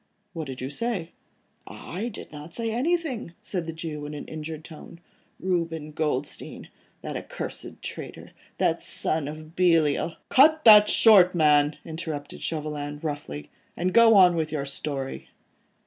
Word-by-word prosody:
"What 160 -4 -5
did 130 -1 -7
you 130 +2 -4
say?" 190 -2 -3 0.6
"I 200 +7 -6
did 230 - -9
not 150 +2 -9
say 230 -1 -2
anything," 265 - -1
said 180 -5 -3
the - - -3
Jew 155 -2 -6
in 150 - -7
an 145 - -7
injured 155 0 -7
tone, 165 +1 -12 0.4
"Reuben 165 -4 -2
Goldstein, 150 -3 -3 0.3
that - - -5
accursed - - -6
traitor, - - -7 0.3
that - - +1
son 155 -2 -1
of 155 +2 -9
Belial.. 165 -3 +2
." - - -49
"Cut 310 +3 +6
that 210 -2 +9
short, 190 -5 +6
man," 150 -2 +4
interrupted 160 -3 -6
Chauvelin, 150 -2 -4
roughly, 145 - -5 0.3
"and 180 +1 -1
go 230 -1 +7
on 180 -3 +7
with 160 -2 -1
your 145 -3 -2
story." 140 -1 -5
160 Hz, 150 wpm, -26 LUFS, 150-185 Hz, 0.6 s, that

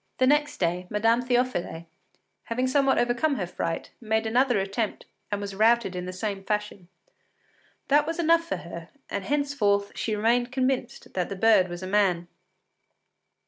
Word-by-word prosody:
The 255 - +3
next 295 +2 +2
day, 180 +1 -1
Madame 225 +3 +2
Théophile, 245 -9 -1 0.6
having 245 +2 -1
somewhat 270 +1 +2
overcome 240 +5 +1
her 195 - -2
fright, 165 -1 -4
made 220 0 0
another 245 +1 +2
attempt, 200 +3 -2 0.3
and 205 - -1
was 200 -1 -5
routed 220 -1 +3
in 180 0 -4
the - - -4
same 195 +1 -4
fashion. 210 -3 -3 1.0
That 295 +1 +4
was 330 - -2
enough 335 0 +3
for - - -3
her, 170 -1 -9 0.2
and 200 -1 -3
henceforth 250 -9 +1
she 220 - -2
remained 240 +3 +1
convinced 260 -1 -2
that 180 -2 -1
the 200 - -4
bird 205 -2 +4
was 175 +1 -7
a - - -4
man. 185 -4 +2
220 Hz, 160 wpm, -26 LUFS, 195-255 Hz, 1.0 s, That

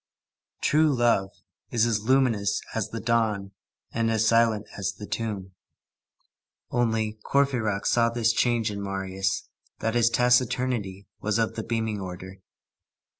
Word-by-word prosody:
True 155 0 +3
love 115 -5 +2 0.4
is 115 -1 +2
as 110 -3 +1
luminous 110 -5 +2
as 110 -3 -2
the 115 - -5
dawn 110 -4 0 0.4
and 115 -1 0
as 110 -1 +2
silent 115 -2 +3
as 100 -3 -2
the 105 - -8
tomb. 105 -4 -4 1.2
Only, 110 -2 0
Courfeyrac 120 -8 +1
saw 115 -1 +3
this 115 -1 +1
change 115 -2 +1
in 100 -1 -5
Marius, 95 -1 -2 0.3
that 115 - -1
his 120 -1 +4
taciturnity 125 -5 +1
was 110 0 0
of 115 -1 0
the 110 - -4
beaming 110 -2 -2
order. 95 +1 -8
110 Hz, 130 wpm, -26 LUFS, 100-115 Hz, 1.2 s, his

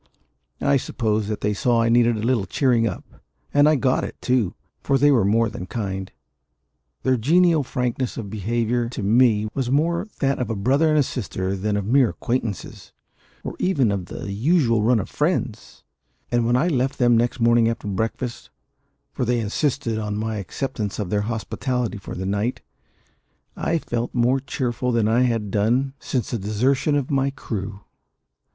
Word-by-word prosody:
I 140 0 +3
suppose 110 -5 -1
they 105 -1 -1
saw 115 +3 +2
that - - +2
I - - +2
needed 120 0 +4
a 105 - -4
little 115 -5 +1
cheering 120 -4 +2
up; - - -5 0.5
and 145 +1 +5
I 155 - +4
got 130 -2 +1
it, - - -6
too; 125 -7 0 0.3
for 140 - +2
they 145 +2 +5
were 125 -7 +4
more 115 +4 +3
than 90 -4 -7
kind 95 -3 -4 0.9
their 130 -1 +2
genial 165 +6 +4
frankness 125 -1 -2
of 110 - -5
behaviour 115 +3 -1
to 120 - -5
me 110 0 +3
was 130 -3 -2
more 170 - +1
that 135 -1 +1
of 125 - -2
a 115 - -1
brother 140 +10 +2
and 145 -3 +4
sister 95 -6 -3
than 105 +2 -1
of 100 - -2
mere 125 +2 +4
acquaintances, 115 -5 -4 0.5
or - - -5
even 140 - +2
of 95 -3 -3
the 100 - -6
usual 115 - +2
run 115 +2 +3
of 95 - -4
friends; 150 - -2 0.5
and 120 -1 +2
when 120 - +3
I 130 +7 +2
left 135 -4 0
them 120 -2 +4
next 120 +2 +1
morning 115 0 +4
after 115 -2 -4
breakfast 115 +4 -3 0.6
for - - -2
they 120 0 +1
insisted 115 +1 -1
on 105 -1 -3
my 110 0 -2
acceptance 105 +1 -4
of 100 -4 -4
their 105 -1 +1
hospitality 120 0 -2
for - - -8
the 95 - -4
night 100 +5 -1 0.9
I 165 - 0
felt 120 -6 -3
more 125 +2 +3
cheerful 125 -2 -2
than 115 -3 +2
I 115 +3 +3
had 115 -4 -1
done 120 +7 +1
since 125 -6 -3
the 120 - -1
desertion 125 +9 +1
of 140 -2 -1
my 135 0 +2
crew. 105 -7 -6
120 Hz, 175 wpm, -23 LUFS, 105-130 Hz, 0.9 s, and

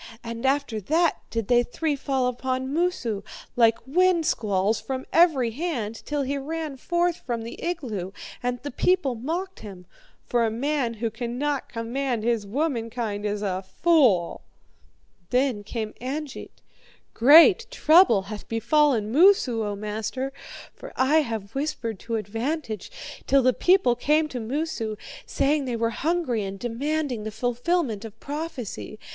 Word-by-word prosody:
And 230 +2 -3
after 270 -5 0
that 325 - +2
did 225 -3 -3
they 240 -1 +5
three 290 +5 -2
fall 270 -2 -1
upon 260 +2 -2
Moosu, 295 - -1 0.3
like 230 -2 +4
wind 345 +3 +3
squalls, 205 -4 +1
from 260 -1 -4
every 300 -9 +4
hand, 240 -6 -3
till 295 -1 -1
he 280 +1 -2
ran 310 0 -4
forth 345 +4 0
from 235 -2 -4
the 230 - -8
igloo, 240 - -3 0.3
and 245 0 -2
the 285 - -4
people 360 -1 +1
mocked 335 +11 -4
him. 190 -4 -10 0.4
For 240 -1 +1
a 225 - +2
man 250 +1 -1
who 225 0 -2
cannot 250 +5 -3
command 235 0 -2
his 230 -3 0
womankind 230 -5 -2
is 205 0 -3
a 190 -2 -1 0.2
fool.' 255 - +4 0.9
"Then 250 -4 +1
came 220 0 -4
Angeit: 280 +3 -6 0.5
'Great 330 - +7
trouble 320 - +5
hath 210 +1 -8
befallen 230 -1 +2
Moosu, 285 - +4
O 205 -1 -2
master, 220 +6 -4 0.4
for - - -11
I 265 +4 +3
have 225 -9 -2
whispered 255 -7 -3
to 230 - -4
advantage, 225 - -3 0.4
till 275 -1 +4
the 255 0 +4
people 360 -9 +3
came 300 +5 +2
to 255 - -5
Moosu, 230 -2 -3 0.3
saying 285 0 +1
they 245 -2 -2
were 230 0 0
hungry 305 -7 -1
and 195 0 -5
demanding 255 +2 -2
the 215 - -3
fulfilment 245 - -1
of 225 -1 -10
prophecy. 290 -8 -6
250 Hz, 145 wpm, -25 LUFS, 225-300 Hz, 0.9 s, Great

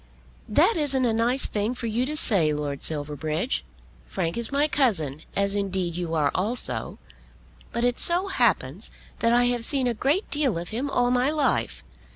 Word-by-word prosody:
"That 335 - +4
isn't 270 -4 +1
a 230 - +1
nice 240 +4 +2
thing 215 +4 -1
for 245 - -5
you 235 +3 -1
to 305 +1 -3
say, 180 - +2
Lord 145 -2 -3
Silverbridge. 155 - -2 0.4
Frank 170 -3 -2
is 235 +1 0
my 285 +2 +2
cousin, 175 - 0
as 200 0 +1
indeed 190 -4 -2
you 170 -2 -3
are 150 -3 +2
also; 215 +7 -2 0.7
but 235 - -2
it 245 0 +1
so 350 +3 +3
happens 210 - 0 0.3
that 230 - +2
I 240 +1 +4
have 245 -1 +1
seen 270 +1 +2
a 245 - +1
great 280 - 0
deal 280 - +1
of 170 +1 -5
him 250 +6 -3
all 245 -2 +1
my 250 +2 +2
life. 295 -4 0
230 Hz, 180 wpm, -25 LUFS, 175-265 Hz, 0.7 s, That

